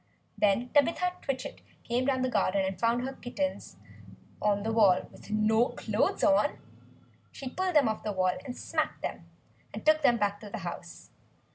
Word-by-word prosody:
Then 210 Hz, +4 st, +2 dB
Tabitha 335 Hz, +6 st, +2 dB
Twitchit 265 Hz, -2 st, -4 dB, 0.2 s
came 245 Hz, +2 st, 0 dB
down 260 Hz, -1 st, +1 dB
the -, -, +2 dB
garden 195 Hz, -5 st, +1 dB
and 190 Hz, -1 st, -4 dB
found 235 Hz, +1 st, +2 dB
her 265 Hz, +1 st, -3 dB
kittens 280 Hz, +3 st, -4 dB, 0.6 s
on 205 Hz, -1 st, +1 dB
the 225 Hz, -, -1 dB
wall 200 Hz, -5 st, +4 dB
with -, -, -15 dB
no 220 Hz, +3 st, +3 dB
clothes -, -, -1 dB
on. 290 Hz, -1 st, +3 dB, 0.7 s
She 275 Hz, -, -8 dB
pulled 370 Hz, +6 st, -2 dB
them 285 Hz, -5 st, +6 dB
off 220 Hz, -1 st, -2 dB
the 215 Hz, -, -2 dB
wall, 185 Hz, -2 st, +1 dB, 0.2 s
smacked -, -, -3 dB
them, -, -, -5 dB, 0.5 s
and -, -, -7 dB
took 310 Hz, 0 st, +5 dB
them 240 Hz, -5 st, +4 dB
back 205 Hz, -1 st, 0 dB
to 210 Hz, -, -10 dB
the -, -, -5 dB
house. -, -, -8 dB
235 Hz, 170 wpm, -29 LUFS, 205-275 Hz, 0.7 s, them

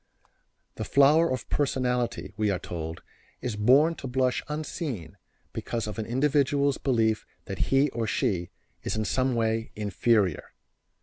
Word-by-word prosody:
The -, -, -3 dB
flower 150 Hz, +4 st, +5 dB
of 130 Hz, -2 st, -3 dB
personality, 125 Hz, -9 st, 0 dB
we 105 Hz, -1 st, +1 dB
are 95 Hz, -, +1 dB
told, 85 Hz, -2 st, -6 dB, 0.4 s
is 120 Hz, -4 st, -3 dB
born 135 Hz, +10 st, +5 dB
to 135 Hz, -, -6 dB
blush 125 Hz, 0 st, +1 dB
unseen 150 Hz, -, -4 dB, 0.4 s
because 115 Hz, -1 st, -3 dB
of 105 Hz, +1 st, -5 dB
an 110 Hz, -, -3 dB
individual's 140 Hz, +2 st, +2 dB
belief 115 Hz, -5 st, +1 dB, 0.2 s
that -, -, -3 dB
he 135 Hz, +2 st, +4 dB
or 115 Hz, -2 st, -2 dB
she 90 Hz, -4 st, 0 dB, 0.3 s
is -, -, -3 dB
in 110 Hz, 0 st, -1 dB
some 130 Hz, +3 st, +1 dB
way 115 Hz, -1 st, 0 dB
inferior. 105 Hz, -3 st, +1 dB
120 Hz, 140 wpm, -27 LUFS, 105-135 Hz, 0.4 s, flower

